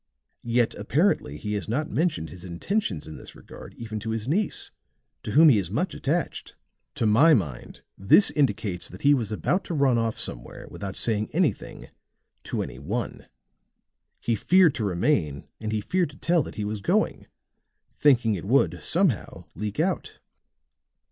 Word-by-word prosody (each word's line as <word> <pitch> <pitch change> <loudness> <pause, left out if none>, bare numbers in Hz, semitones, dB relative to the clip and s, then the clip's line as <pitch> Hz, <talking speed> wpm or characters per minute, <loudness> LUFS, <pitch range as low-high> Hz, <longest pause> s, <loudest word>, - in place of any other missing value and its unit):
Yet 120 0 +1
apparently 140 - +1
he 105 +6 -4
has 105 0 -3
not 145 +7 -1
mentioned 150 - -1
his 85 +1 -11
intentions 90 - -2
in 80 - -9
this - - -12
regard - - -12
even 110 -2 -6
to 110 +2 -6
his 110 0 -3
niece, 190 +8 -1 0.5
to - - -5
whom 160 +3 +7
he 115 -7 +5
is 90 -4 -4
much 155 - -1
attached. 165 +5 -3 0.4
To - - 0
my 135 +10 +6
mind 75 - -4 0.2
this 100 - +5
indicates 105 -9 -1
that - - -12
he 145 +1 +6
was 115 -6 -1
about 180 - 0
to 170 - -4
run 135 -5 +3
off 115 -1 -1
somewhere - - -5
without 100 -2 -6
saying 110 -2 0
anything - - -1 0.6
to - - -2
any 65 - -9
one. 105 - -4 0.9
He 120 - -1
feared 175 - +4
to 115 - -3
remain 85 - 0
and 110 -1 -4
he 110 -1 -1
feared 180 - 0
to 145 - -15
tell 170 -1 +2
that - - -7
he 105 - -3
was 105 0 -4
going, - - 0 0.7
thinking 125 -6 +3
it 95 -3 -5
would, 130 +7 +2
somehow, 170 - 0
leak 105 +4 -5
out." 180 +3 -1
115 Hz, 170 wpm, -25 LUFS, 100-150 Hz, 0.9 s, whom